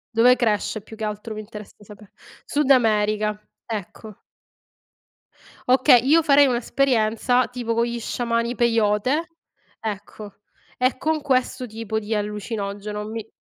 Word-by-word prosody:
Dove 250 +2 +5
cresce 215 -2 0
più 220 +2 -13
che 220 - -7
altro 210 +1 -4
mi 215 - -6
interessa 210 -1 -11
sape 205 0 -15 0.3
Sud 290 -1 0
America, 215 -3 +2 0.3
ecco. 215 -1 -7 1.5
Okay, 255 0 +6
io 320 +4 +5
farei 285 -2 +5
un'esperienza 245 -1 +1
tipo 240 -2 -3
con 230 +1 +1
gli 235 0 -4
sciamani 235 0 -1
Peyote, 235 +7 +1 0.5
ecco, 210 -1 -7 0.4
e 255 +1 +1
con 315 -1 0
questo 255 -2 0
tipo 220 -1 -5
di 220 +1 -3
allucinogeno, 210 0 -4
mi 225 0 -6
225 Hz, 125 wpm, -23 LUFS, 210-250 Hz, 1.5 s, Okay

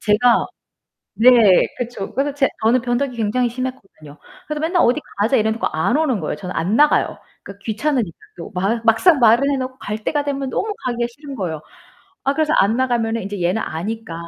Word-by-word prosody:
제가 230 +3 +3 0.7
네 240 +3 +7 0.5
그쵸. 240 -5 -5
그래서 280 +1 -1
제 280 -2 +2
저는 235 +3 +3
변덕이 250 +1 -1
굉장히 235 +3 0
심했거든요. 235 - -7 0.3
그래서 300 -1 -3
맨날 340 +2 +2
"어디 250 +6 +2 0.2
가자." 225 +6 +3
이래 220 -2 +2
놓고 225 - -3
안 160 - 0
오는 300 -8 +1
거예요. 155 - -3
저는 180 +4 -7
안 175 +6 0
나가요. 295 +2 +3 0.3
그니까 200 0 -11
귀찮으니까 225 - -1 0.2
또. 170 - -8
마 195 +6 0
막상 230 +9 +4
말을 240 +4 +5
해 280 - +1
놓고 260 0 -5
갈 210 +1 -5
때가 290 +5 -1
되면 275 -2 -3
너무 425 +9 -2
가기가 240 -1 -1
싫은 280 +3 -10
거예요. 165 -7 -4 0.6
아 275 - +2
그래서 310 0 +1
안 215 +4 +3
나가면은 230 -3 0
이제 200 0 -6
얘는 185 +6 +1
아니까 205 +3 -5
235 Hz, 400 characters per minute, -20 LUFS, 210-275 Hz, 0.7 s, 네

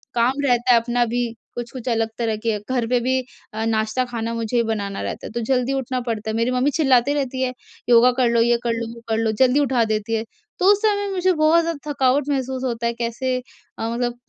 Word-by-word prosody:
काम 240 +2 +3
रहता 245 -1 +3
है 235 - +6
अपना 240 +1 +1
भी 240 +1 -1 0.3
कुछ-कुछ 240 +1 -5
अलग 225 -1 +1
तरह 230 -2 0
के। 225 -2 +1
घर 245 -3 0
पे 245 0 +2
भी 260 +2 +1 0.3
अ, 220 +1 -2
नाश्ता, 220 +3 0
खाना 230 -1 -4
मुझे 230 +1 0
बनाना 205 -3 -3
रहता - - -5
है, - - -10
तो 235 - -2
जल्दी 250 +1 0
उठना 260 -1 -2
पड़ता 225 -3 -3
है। - - -3
मेरी 230 +2 +1
मम्मी 255 +3 +1
चिल्लाती 270 -3 +3
रहती 265 -2 -2
है, 255 - -1 0.4
"योगा 240 +1 +7
कर 245 -2 +4
लो, 235 0 +3
ये 240 +1 +3
कर 235 -1 0
लो, 230 0 -3
वो 235 - -12
कर 220 - +1
लो।" 225 -1 +1
जल्दी 260 +3 +3
उठा 260 -4 +2
देती 215 +1 -2
है, 220 - -1 0.4
तो 365 - +1
उस 415 +1 +2
समय 405 -2 +2
मुझे 370 -1 +2
बहुत 315 +1 +4
ज़्यादा 305 -3 -4
थकावट 270 0 +2
महसूस 265 -2 -2
होता 235 -2 -1
है, 235 - -1
कैसे 245 +2 -2 0.4
अ, 225 - -2
मतलब 240 +1 -2
245 Hz, 230 wpm, -22 LUFS, 230-260 Hz, 0.4 s, योगा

